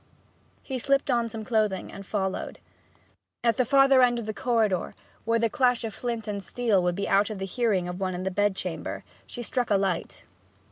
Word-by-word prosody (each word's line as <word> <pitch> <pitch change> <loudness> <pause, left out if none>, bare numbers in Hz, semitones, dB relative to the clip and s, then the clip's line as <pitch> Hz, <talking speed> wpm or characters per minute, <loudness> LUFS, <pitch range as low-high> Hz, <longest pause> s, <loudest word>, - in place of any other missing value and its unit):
He 265 -2 -4
slipped 275 +2 +1
on 235 -1 +1
some 220 -1 -6
clothing 215 -4 0
and 200 - -9
followed. 190 -1 -3 0.9
At 230 -2 +2
the 255 - +3
farther 270 +1 +5
end 245 -1 +4
of 235 - -4
the 215 - -3
corridor, 220 -7 0 0.3
where 230 0 +2
the 230 0 +2
clash 250 -2 +2
of 220 -2 -4
flint 235 -2 -4
and 205 -1 -3
steel 210 +1 +1
would 175 0 0
be 200 +1 -2
out 200 +2 +3
of 215 - -5
the 190 - -3
hearing 195 -3 0
of 180 +1 -5
one 185 -1 -1
in 180 - -4
the 190 - -1
bed 205 +1 +1
chamber, 180 -3 -5 0.2
she 240 - -6
struck 245 +1 -1
a 205 - +4
light. 190 -3 -2
215 Hz, 205 wpm, -27 LUFS, 195-240 Hz, 0.9 s, farther